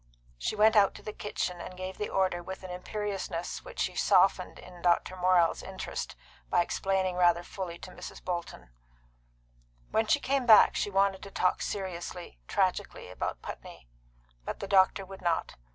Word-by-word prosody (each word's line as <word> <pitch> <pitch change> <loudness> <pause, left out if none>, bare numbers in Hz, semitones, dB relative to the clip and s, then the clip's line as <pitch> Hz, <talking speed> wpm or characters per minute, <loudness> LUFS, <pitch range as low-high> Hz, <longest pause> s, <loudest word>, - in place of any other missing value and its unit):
She - - -1
went 215 +1 +5
out 200 -2 +5
to - - -11
the 215 - -6
kitchen, 180 -4 -3
and 180 - -8
gave 185 0 -6
the 210 - -2
order 185 -2 +1
with 190 +2 -8
an 185 - -7
imperiousness 190 -2 -4
which - - -10
she - - 0
softened - - +3
in 180 -1 -12
Dr. 175 +1 +2
Morrell's 180 -2 +3
interest - - -5 0.3
by - - +4
explaining 190 0 -1
rather 175 -1 +4
fully 175 -2 -6
to 185 - -10
Mrs. - - -9
Bolton. 170 - -5 1.2
When 220 0 +2
she 290 - +4
came 270 -2 0
back 220 -2 +8
she - - 0
wanted 195 -1 +2
to 200 - -8
talk 185 -1 +1
seriously, 180 - -5
tragically, 90 - -1
about 90 - -4
Putney. - - -9 0.6
But - - -5
the 200 - -5
doctor 195 0 +4
would 195 0 -11
not. 170 -2 -1
185 Hz, 170 wpm, -30 LUFS, 175-200 Hz, 1.2 s, back